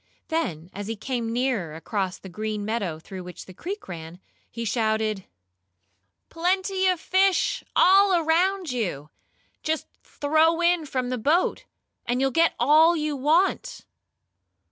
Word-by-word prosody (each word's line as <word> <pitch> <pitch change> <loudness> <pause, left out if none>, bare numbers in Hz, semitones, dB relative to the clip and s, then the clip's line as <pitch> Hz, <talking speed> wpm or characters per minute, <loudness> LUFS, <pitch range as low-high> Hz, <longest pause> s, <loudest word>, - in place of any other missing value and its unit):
Then, 180 - -2
as 205 0 -6
he 225 - -3
came 230 +1 -3
nearer 230 -10 -1
across 190 +2 -3
the - - -12
green 215 +2 -4
meadow 205 -7 -2
through 185 +3 -9
which 180 0 -10
the 185 - -12
creek 385 - -7
ran, 170 -1 -8 0.3
he 230 0 -5
shouted: 220 -2 0 1.0
"Plenty 375 +3 0
of 365 -2 +2
fish 380 +2 +2
all 390 +1 +6
around 345 +1 +1
you. 175 - -3 0.5
Just 315 0 -2 0.2
throw 315 +3 +1
in 345 -2 +2
from 255 -2 -2
the 250 -1 -2
boat, 315 +10 +1 0.4
and 245 +1 0
you'll 270 0 +1
get 330 +4 +3
all 310 +7 +5
you 300 -1 -1
want." 335 - +1
260 Hz, 140 wpm, -25 LUFS, 205-335 Hz, 1.0 s, all